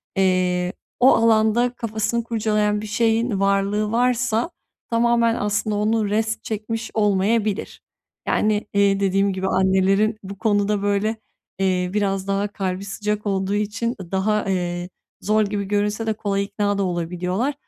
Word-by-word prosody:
eee, 185 -1 +1 0.3
o 255 +2 +6
alanda 225 +2 +3
kafasını 225 0 -2
kurcalayan 210 -2 0
bir 215 - -6
şeyin 225 0 +1
varlığı 200 +2 +1
varsa 245 +2 +1 0.4
tamamen 235 0 +2
aslında 210 0 -1
onu 210 0 +1
rest 220 +1 -1
çekmiş 225 +1 -4
olmayabilir. 210 0 0 0.5
Yani, 210 0 +1
iii, 200 -1 +3
dediğim 195 0 +2
gibi 190 0 -2
annelerin 190 +3 +2
bu 195 0 -8
konuda, 205 -1 +1
böyle, 205 +2 0 0.4
eee, 185 -2 +1
biraz 195 -2 -1
daha 200 +1 0
kalbi 195 -1 -4
sıcak 210 +1 -3
olduğu 195 0 0
için, 220 +3 -2
ııı, 175 -1 -11
daha, 210 +2 +1
eee, 175 -1 -2 0.3
zor 215 +1 +2
gibi 200 0 -3
görünse 210 +2 -1
de 220 - +2
kolay 200 -2 -1
ikna 205 0 -1
da 200 - +1
olabiliyorlar. 180 - -2
205 Hz, 140 wpm, -22 LUFS, 195-220 Hz, 0.5 s, o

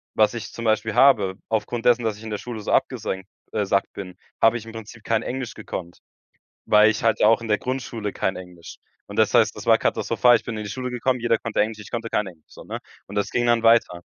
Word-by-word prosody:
was 110 +1 +3
ich 115 -2 -7
zum 115 - -7
Beispiel 110 0 +1
habe, 105 -9 +4
aufgrund 115 +2 -2
dessen, 120 -1 +4
dass 110 -2 -1
ich 105 - -13
in 110 - -7
der 105 - -3
Schule 115 -2 -7
so - - -4
abgesenkt, 95 0 -1 0.2
äh 105 -2 -1
sackt 100 0 0
bin, 90 -2 -8 0.3
habe 115 +1 +5
ich 115 - -9
im 115 - -9
Prinzip 110 0 -10
kein 115 -1 0
Englisch 125 -2 -4
gekonnt, 85 -1 -7 0.7
weil 105 0 +6
ich 110 - -3
halt 115 -2 +2
ja 105 - +6
auch 115 +1 +4
in 115 - -7
der 105 -1 +2
Grundschule 120 -5 -4
kein 95 - -1
Englisch. 90 -2 -11 0.3
Und - - -10
das - - +3
heißt, - - +4
das - - -9
war - - +5
katastrophal. 125 -1 +3
Ich - - -5
bin 115 - -5
in 105 - -5
die 100 - -6
Schule 125 +3 -4
gekommen, 125 +1 -1
jeder 115 -1 +2
konnte 115 -2 -2
Englisch, 110 +1 0
ich 105 - -11
konnte 115 -1 -3
kein 105 - 0
Englisch, 85 -4 -13
so, - - -13
ne? - - -5 0.3
Und - - -10
das 105 - -1
ging 120 0 0
dann 120 -1 +3
weiter. 115 -6 +3
110 Hz, 255 wpm, -23 LUFS, 105-120 Hz, 0.7 s, weil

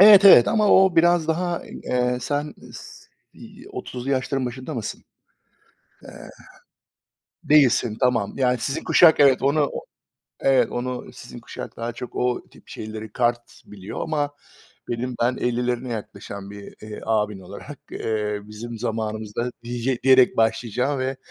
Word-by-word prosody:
Evet, 205 0 +9
evet 125 -11 +9
ama 215 -2 +2
o 190 -3 +5
biraz 170 -1 +4
daha, 175 +1 -1
eee, 125 0 -2
sen 145 +3 -3 0.2
si - - -14
30'lu 125 +2 -5
yaşların 130 0 -1
başında 130 +2 -6
mısın? 115 -4 -5 1.0
Eee, - - -11 1.3
değilsin. 125 -6 +3
Tamam. 125 -6 +1
Yani, 125 -2 +2
sizin 140 +6 -3
kuşak, 165 -3 +6
evet, 140 -3 +5
onu 140 +1 +2
o - - -3 0.6
evet, 135 -1 +3
onu 125 0 -4
sizin - - -11
kuşak - - -9
daha 115 +1 -3
çok 125 - -8
o 125 0 -1
tip - - -20
şeyleri 110 -1 -7
kart 120 0 -1
biliyor 100 -1 -8
ama 145 -2 -1 0.6
benim 120 +1 -3
ben 125 +2 +2
50'lerine 125 +1 -1
yaklaşan 100 -2 -8
bir, 100 -1 -11
eee, 105 0 -8
abin 105 -2 0
olarak, 90 - -10
eee, 105 -1 -2
bizim 110 +3 -8
zamanımızda, 110 +1 -3
dije 120 +1 -2
diyerek 130 -1 +5
başlayacağım 125 +4 0
ve, 130 +1 -2
125 Hz, 140 wpm, -23 LUFS, 110-140 Hz, 1.3 s, Evet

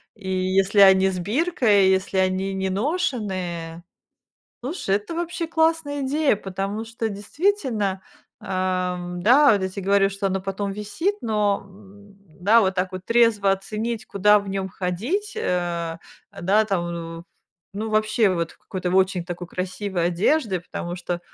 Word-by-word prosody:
и 200 -4 -8
если 190 +2 +1
они 190 -1 +7
с 185 -1 -3
биркой, 215 - +2
если 190 0 0
они 190 +1 +1
не 190 0 -1
ношеные. 190 - -2 0.8
Слушай, 255 - -1
это 210 +11 -6
вообще 340 0 -3
классная 320 -3 +1
идея, 285 -2 +2
потому 195 +3 -4
что 225 0 -3
действительно, 210 - -1 0.4
эм, 180 -1 -2
да, 270 +7 +6
вот 205 - +2
я 190 - 0
те 190 +2 -6
говорю, 195 +1 +3
что 195 0 -3
она 190 0 -1
потом 195 +1 -3
висит. 210 - -2
Но, 210 -3 +1
м, 200 +1 -17 0.2
да, 215 +6 +5
вот 190 -1 +1
так 185 0 -1
вот 185 0 -7
трезво 230 -4 +3
оценить, 215 +3 -4
куда 210 +1 +4
в 200 -1 -7
нём 195 0 -2
ходить, 230 - -3
э, 170 - -2 0.4
да, 200 +5 +3
там, 175 -4 -1
ну 165 0 -7 0.5
ну 220 +2 -3
вообще, 215 0 +2
вот 170 -2 -2
в - - -25
какой-то 185 -2 -4
в - - -1
очень 190 -2 +2
такой 175 0 -6
красивой 185 -1 -2
одежде. 190 - +1
Потому 175 0 -6
что 175 -1 -4
195 Hz, 155 wpm, -23 LUFS, 185-220 Hz, 0.8 s, они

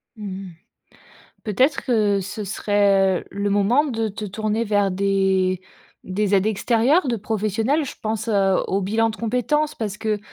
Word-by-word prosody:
Mmh 215 -2 -8 0.2
mh. - - -11 0.9
Peut-être 260 +6 +1
que 210 -5 +2
ce 205 +3 -5
serait, 195 -2 +2
heu, - - -14
le 200 +1 -2
moment 205 +8 +3
de 225 -6 -2
te 210 +1 -6
tourner 215 +3 -2
vers 205 -2 +1
des 190 -1 +1 0.4
des 200 +2 0
aides 195 +1 +3
extérieures 235 - +2
de 240 - 0
professionnel? 220 +7 0
Je 275 - -7
pense, 220 +1 -3
heu, 195 -3 +3
au 195 +1 0
bilan 225 +4 +1
de 220 - -8
compétence, 270 +7 0
parce 210 -3 -4
que 215 -1 -1
210 Hz, 165 wpm, -22 LUFS, 195-230 Hz, 0.9 s, moment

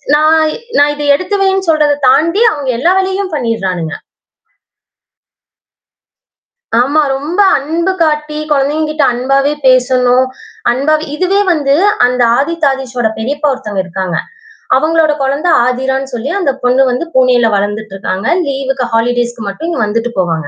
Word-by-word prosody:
நான் 315 +1 +3 0.3
நான் 290 +1 +4
இதை 295 0 -4
எடுத்து 370 +7 -3
வைன்னு 385 -1 0
சொல்றத 300 -2 +3
தாண்டி 335 - +2
அவங்க 285 -6 -4
எல்லா 340 +8 +2
வேலையையும் 380 -1 -2
பண்ணிருறானுங்க. 190 - -2 2.9
ஆமா. 285 +5 +2 0.2
ரொம்ப 305 +8 -3 0.2
அன்பு 330 +6 -1
காட்டி 300 -1 -1
குழந்தைகக்கிட்ட 300 +2 0
அன்பாவே 275 +3 +1
பேசணும். 255 0 +3 0.4
அன்பாவே 305 +5 0
இதுவே 370 +5 +1
வந்து 285 -4 +1 0.3
அந்த 250 0 0
ஆதித், 320 +3 0
ஆதீஷ்சோட 250 -3 -2
பெரியப்பா 290 +6 -1
ஒருத்தங்க 210 -7 -4
இருக்காங்க'. 185 -1 -3 0.6
அவுங்களோட 315 +2 +2
குழந்தை 280 +6 0 0.2
ஆதிரானு 265 +2 -1
சொல்லி 245 +3 -4
அந்த 335 -8 +1
பொண்ணு 250 +2 +3
வந்து 250 +6 -2
பூனேல 255 -2 +3
வளர்ந்துட்டு 205 +1 -3
இருக்காங்க. 195 0 -3 0.2
லீவ்க்கு 270 -2 -2
ஹாலிடேஸ்க்கு 240 0 -1
மட்டும் 290 +12 -5
இங்க 335 - -2
வந்துவிட்டு 230 +3 -2
போவாங்க. 165 -4 -1
270 Hz, 125 wpm, -13 LUFS, 245-310 Hz, 2.9 s, நான்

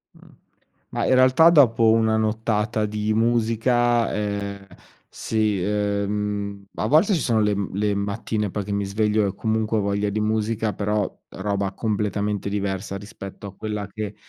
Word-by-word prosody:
Mh, - - -18 0.7
ma - - -2
in - - +4
realtà 130 +6 +6
dopo 120 -8 +5
una 110 -1 +3
nottata 110 0 0
di 105 +1 -1
musica, 120 +1 +2
ehm, 100 -1 -3 0.4
sì, 110 -3 -1
ehm, 100 0 -2
a - - -1
volte 170 +8 +4
ci 165 - 0
sono 115 -3 +1
le 105 -1 +2 0.2
le 105 +1 0
mattine 100 +1 -2
poi, 105 +1 -3
che 100 - -5
mi 100 0 0
sveglio 105 +1 +1
e 100 - -3
comunque 110 0 0
ho - - +2
voglia 100 +1 0
di 105 +1 -2
musica, 110 0 0
però 105 0 -1 0.2
roba 100 0 -2
completamente 105 -1 -2
diversa 100 -1 -3
rispetto 100 0 -9
a 100 - -9
quella 105 -1 -4
che 105 0 -6
105 Hz, 155 wpm, -23 LUFS, 100-110 Hz, 0.7 s, realtà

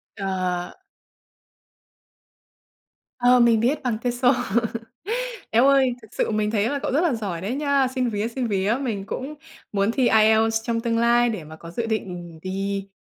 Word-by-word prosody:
Ờ. 185 -3 -2 2.5
Ờ, 245 0 +5
mình 235 -2 +5
biết 265 +6 0
bằng 235 -4 0
TESOL. 245 +2 +2 1.2
Eo 235 +4 +4
ơi, 265 -3 +4
thực 220 - -14
sự - - 0
mình 210 0 0
thấy 220 0 +1
là 285 - -1
cậu - - -3
rất 295 - +3
là 335 -8 +2
giỏi 195 -7 -4
đấy 210 +7 -3
nha! 280 -2 +2
Xin 255 -1 -1
vía, 210 +1 -1
xin 245 0 -3
vía, 205 +2 +1
mình 210 -7 -3
cũng 280 +4 -5 0.4
muốn 200 +2 +1
thi 255 -2 +2
IELTS 220 +1 +4
trong 230 -1 -1
tương 230 -1 0
lai 240 +1 +4
để 190 -8 -5
mà 160 +1 -11
có 170 +1 -11
dự 230 +5 -3
định 180 -6 -4
đi, 195 +1 -3
225 Hz, 170 wpm, -23 LUFS, 200-245 Hz, 2.5 s, Ờ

